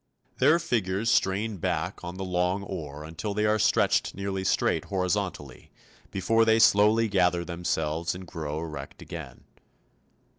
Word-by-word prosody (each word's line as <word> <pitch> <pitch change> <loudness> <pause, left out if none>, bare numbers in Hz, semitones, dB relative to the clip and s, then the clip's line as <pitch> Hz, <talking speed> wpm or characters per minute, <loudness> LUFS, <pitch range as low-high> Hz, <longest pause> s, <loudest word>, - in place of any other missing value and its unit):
Their 155 +3 +5
figures 115 - 0
strain 100 +3 +1
back 90 +2 -2
on 90 +1 -6
the 95 - -4
long 90 +2 0
oar 75 -5 -6
until 80 +6 -5
they 105 0 +1
are 105 0 +2
stretched 105 +1 +2
nearly 100 -1 -3
straight - - +1
horizontally 90 -7 -3 0.4
before 115 +4 +2
they 110 0 +4
slowly 110 +1 +5
gather 90 -4 +2
themselves 85 -1 -2
and 90 +1 -8
grow 75 -3 -5
erect 75 -4 -7
again. 65 - -9
95 Hz, 140 wpm, -27 LUFS, 85-105 Hz, 0.4 s, Their